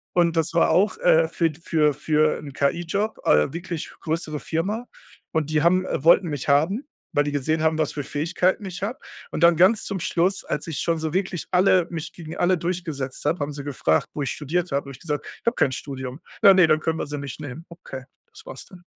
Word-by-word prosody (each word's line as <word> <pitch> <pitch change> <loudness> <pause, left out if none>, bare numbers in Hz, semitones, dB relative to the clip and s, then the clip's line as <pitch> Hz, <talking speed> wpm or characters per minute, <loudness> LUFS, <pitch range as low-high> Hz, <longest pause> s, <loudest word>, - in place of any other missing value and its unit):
Und 170 -1 +3
das 165 0 0
war 170 - +4
auch, 200 - +3
äh, - - +4
für 165 -2 +1
für 150 -4 +2
für 155 +1 +1
'n 145 -2 -8
KI-Job, 175 +9 -1
äh 75 - +3
wirklich 170 -2 -5
größere 155 -2 -3
Firma. 205 +9 -2 0.4
Und 155 -2 -1
die 155 -1 +2
haben, 185 +2 +3
äh 145 - -3
wollten 170 +2 +6
mich 145 -4 -4
haben, 190 - +2 0.3
weil 145 - +3
die 145 - -2
gesehen 155 +3 0
haben, 160 0 +2
was 155 -2 0
für 145 - -4
Fähigkeiten 180 +8 0
ich 180 -1 -6
habe. 230 +6 -2 0.3
Und - - -2
dann 170 -1 +6
ganz 190 +6 +4
zum 195 -2 -3
Schluss, 180 +3 0
als 150 - -3
ich 155 -4 -4
schon 170 -1 +1
so 160 -1 -3
wirklich 185 -3 -2
alle 185 -1 +4
mich 160 -1 -5
gegen 165 -2 -9
alle 180 +1 +3
durchgesetzt 165 -7 -4
habe, 160 +4 +2
haben 145 +1 -3
sie 140 0 -6
gefragt, 125 - 0
wo 145 - -2
ich 135 - -2
studiert 165 +3 -2
habe. 140 +1 +1
Da - - -24
habe - - -7
ich 130 - -12
gesagt: 150 -3 -3 0.2
„Ich - - -54
habe 235 - +2
kein 130 - +2
Studium.“ 130 0 -6 0.2
„Ja, 200 - +10
ne, 185 -3 +6
dann 155 0 +3
können 160 +1 -1
wir - - -2
Sie 145 0 -4
nicht 140 0 -7
nehmen.“ 145 +2 -7
Okay, 150 -6 -9 0.3
das 450 +1 -13
war's - - -9
dann. 180 -2 -16
160 Hz, 230 wpm, -24 LUFS, 145-180 Hz, 0.4 s, Ja